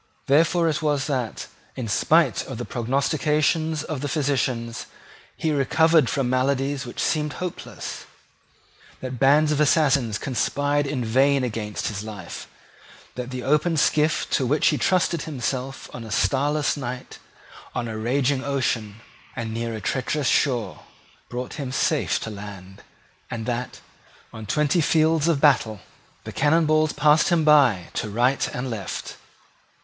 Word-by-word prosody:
Therefore 165 +4 +3
it 155 0 0
was 145 -3 0
that, 130 -6 -3 0.3
in 125 -3 -4
spite 155 +6 +3
of 130 - -6
the 120 - -4
prognostications 150 +5 0
of 155 -4 -5
physicians, 130 -5 -1 0.5
he 160 - 0
recovered 155 0 +3
from 135 -3 0
maladies 135 +1 0
which 120 - -8
seemed 150 -2 0
hopeless, 180 -2 -6 1.0
that 130 -2 -5
bands 150 +4 +4
of 150 0 +1
assassins 140 -7 +3
conspired 145 +5 0
in 130 -4 -2
vain 135 +4 +3
against 105 -3 -3
his 105 -2 -5
life, 105 -5 -8 0.7
that 125 0 -5
the 130 -1 -5
open 150 +4 +2
skiff 155 +1 +2
to 130 - +1
which 150 +4 +3
he 150 - +1
trusted 175 -3 +1
himself 135 -2 -4
on 120 - -7
a 110 - -9
starless 145 +5 +1
night, 125 -3 -6 0.6
on 120 -1 -2
a 110 - -5
raging 130 +4 0
ocean, 115 -6 -2 0.3
and 115 -3 -4
near 115 0 -3
a - - -5
treacherous 135 +6 -1
shore, 125 -6 +1 0.5
brought 125 +1 -5
him 135 -3 -4
safe 130 - +1
to 110 - -5
land, 100 -2 -10 0.5
and 110 -2 -5
that, 125 0 -4 0.5
on 110 -2 -8
twenty 150 - +2
fields 160 0 +2
of 165 -4 +2
battle, 125 -8 +3 0.4
the - - -7
cannon 155 +3 +2
balls 155 0 +3
passed 150 +2 +3
him 170 -3 +2
by 135 - +4
to 105 - -3
right 125 +6 +1
and 125 0 -4
left. 100 -5 -5
135 Hz, 145 wpm, -24 LUFS, 120-150 Hz, 1.0 s, bands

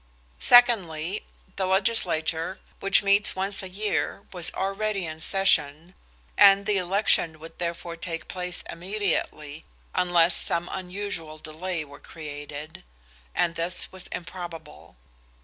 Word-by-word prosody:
Secondly, 200 -7 +4 0.3
the 190 -1 0
legislature, 185 -4 +1 0.2
which 195 +1 +3
meets 200 +1 +4
once 195 +1 -1
a 190 - -7
year, 205 +3 -2
was 175 -2 +3
already 195 0 -1
in 155 -1 -7
session, 165 -3 +2 0.4
and 195 - +7
the 210 -1 +2
election 180 -3 +2
would 165 +1 -13
therefore 170 0 -4
take 165 -1 -5
place 180 -1 -4
immediately, 170 -5 -3 0.3
unless 175 -1 +3
some 170 +1 0
unusual 180 -4 -5
delay 160 +2 -4
were 145 0 -13
created, 150 0 -8 0.5
and 170 - +2
this 170 +2 0
was 185 -1 -6
improbable. 175 - -8
180 Hz, 115 wpm, -26 LUFS, 160-195 Hz, 0.5 s, and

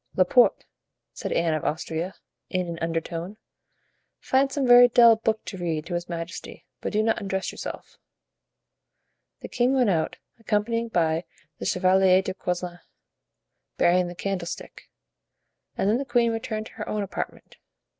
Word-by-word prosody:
"Laporte," 190 +7 +4 0.5
said - - -5
Anne 165 -1 +1
of 155 - -2
Austria, 160 +3 -3 0.3
in 185 -1 -1
an 170 -1 -5
undertone, 165 +4 -3 0.8
"find 270 +1 +2
some 275 -1 -1
very 245 0 +8
dull 235 -1 +7
book 220 0 -1
to 190 - -7
read 160 -3 -2
to 180 - -6
his 175 0 -3
majesty, 170 +1 -7
but - - -4
do 215 +1 +1
not 225 0 +1
undress 190 -1 -2
yourself." - - -8 1.4
The - - -6
king 250 +2 +1
went 245 -6 +3
out, 160 -3 -1 0.2
accompanied 225 +2 -1
by 165 -1 +1 0.3
the - - -3
Chevalier 185 0 +4
de 190 - -3
Coislin, 180 -1 -4 1.0
bearing 180 +1 +3
the 175 - -7
candlestick, 185 -2 -5 0.9
and - - +1
then 220 +4 +2
the - - -1
queen 240 -2 +2
returned 220 -1 -3
to - - -12
her 210 - -7
own 210 -1 -1
apartment. 195 - -6
190 Hz, 150 wpm, -25 LUFS, 175-225 Hz, 1.4 s, very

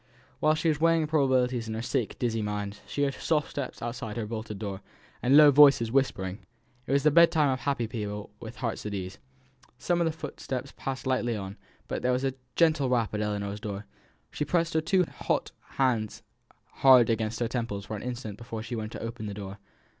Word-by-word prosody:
While 155 0 +3
she 160 +2 -1
was 155 -2 +1
weighing 165 -1 +4
probabilities 130 -6 +1
in 110 - -3
her 110 - -3
sick 120 -2 -2
dizzy 115 -2 -1
mind, 105 -1 -3
she 145 - -1
heard 140 -1 +1
soft 150 +1 0
steps 140 -4 -5
outside 115 -2 -5
her 115 - -2
bolted 110 -1 -5
door, 100 -2 -5 0.4
and 135 +4 +5
low 150 -1 +9
voices 140 -5 +6
whispering. 105 -8 0 0.5
It - - -3
was 140 0 +3
the 155 - +5
bedtime 160 -3 +5
of 130 - -1
happy 130 -1 -1
people 105 -2 -5
with 115 +1 -8
hearts 120 -3 -3
at 105 - -4
ease. 95 0 -6 0.6
Some 175 +6 0
of - - +3
the 160 - +1
footsteps 140 -4 -6
passed 135 -1 -5
lightly 125 -3 0
on; 95 -1 -6 0.3
but - - -3
there 125 - +1
was 125 +1 0
a 135 -1 0 0.2
gentle 155 -5 +3
rap 115 -4 +1
at 105 - -1
Ellinor's 105 -1 -2
door. 105 -2 -5 0.5
She - - -2
pressed 165 +2 0
her 160 - +2
two 180 +3 +3
hot - - -2 0.3
hands 120 -6 0 0.5
hard 125 -4 +7
against 110 0 -1
her 120 - +1
temples 115 -4 -3
for 110 - -5
an 105 - -6
instant 120 -4 -5
before 115 -2 -6
she 120 +2 -5
went 110 -1 -4
to - - -6
open 115 -1 -5
the 100 - -5
door. 100 0 -7
120 Hz, 205 wpm, -28 LUFS, 110-140 Hz, 0.6 s, low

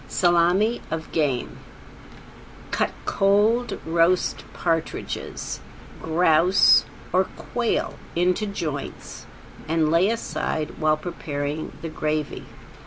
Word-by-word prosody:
~SALMI 180 +6 +3
OF 160 0 -4
GAME~ 145 -6 -1 1.1
Cut - - +1 0.2
cold 210 +5 +2
roast 170 +2 +2
partridges, 165 -2 -3 0.4
grouse 165 +2 +5 0.3
or 185 +1 +4
quail 235 +3 -2 0.2
into 180 +5 +1
joints 155 -8 -5 0.4
and 160 -1 +2
lay 170 +5 +4
aside 155 -8 -3
while 155 -1 +3
preparing 150 -2 -4
the 165 - -3
gravy. 155 -1 -3
165 Hz, 90 wpm, -24 LUFS, 155-190 Hz, 1.1 s, grouse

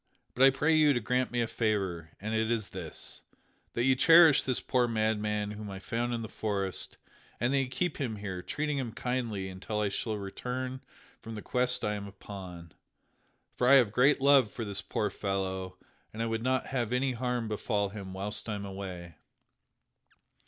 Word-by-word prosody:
But 125 - -3
I 135 - +10
pray 150 +4 +2
you 155 -2 +5
to 120 - +1
grant 125 +3 0
me 120 0 0
a 115 - 0
favor, 95 -8 -1
and 110 +3 -3
it 110 0 +1
is 115 -3 0
this: - - -7 0.5
that 120 - 0
you 130 +1 +4
cherish 165 +2 +7
this 130 -2 0
poor 125 -2 +1
madman 105 -2 0
whom 105 0 -7
I 95 - -6
found 120 +5 -2
in 115 -1 -2
the - - -4
forest, 100 -4 -3 0.4
and 120 +4 +1
that 140 - +4
you 135 - 0
keep 145 +6 -2
him 125 -7 -2
here, 95 -3 -5
treating 150 +6 -2
him 120 -4 -4
kindly 120 -6 -2
until 95 +3 -4
I 105 -1 +1
shall 110 +2 -2
return 125 +6 -4 0.4
from 115 0 -7
the 105 - -7
quest 125 0 0
I 105 - +1
am 100 -1 -5
upon. 95 -4 -9 0.8
For 125 - +2
I 140 - +9
have 120 -6 +5
great 130 +6 +4
love 135 -4 +6
for 115 - -5
this 100 -1 -2
poor 105 -2 -2
fellow 95 -2 -3 0.3
and 110 +1 -3
I - - 0
would 115 0 -1
not 130 +1 +1
have 120 -4 -2
any 130 +2 +1
harm 125 -1 -2
befall 105 -1 -1
him 100 -2 -7
whilst 105 +3 -3
I 105 - -1
am 100 0 -5
away." 90 -4 -7
110 Hz, 195 wpm, -30 LUFS, 100-125 Hz, 0.8 s, I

